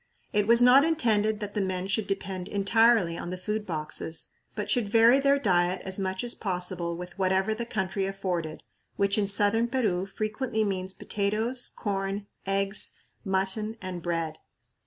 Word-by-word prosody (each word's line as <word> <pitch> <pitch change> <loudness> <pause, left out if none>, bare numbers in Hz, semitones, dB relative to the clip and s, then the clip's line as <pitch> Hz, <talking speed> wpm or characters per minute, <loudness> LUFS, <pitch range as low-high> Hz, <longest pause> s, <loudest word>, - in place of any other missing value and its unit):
It 210 0 +2
was 235 +1 +7
not 255 +3 +7
intended 220 -9 +1
that 205 -1 -5
the 210 - 0
men 185 -1 -2
should 200 +2 0
depend 190 -2 -3
entirely 205 -3 +3
on - - -5
the 185 - -4
food 210 +3 -3
boxes, 160 0 -3 0.3
but - - -3
should 235 -5 0
vary 230 +4 +6
their 280 0 +3
diet 180 -6 +1
as 190 +1 -1
much 190 +1 -2
as 240 - -2
possible 180 -3 -3
with 180 +2 -9
whatever 190 +2 +2
the 235 +2 -4
country 190 -2 -2
afforded, 180 -5 -3 0.3
which 200 +1 +1
in 200 - +1
southern 205 +3 +3
Peru 210 -7 0
frequently 220 +3 -2
means 190 -2 -2
potatoes, 220 +5 0
corn, 195 -1 -3 0.2
eggs, 195 +1 +1 0.3
mutton, 195 +3 -1
and 185 -2 -6
bread. 165 -2 -3
200 Hz, 160 wpm, -27 LUFS, 185-220 Hz, 0.3 s, was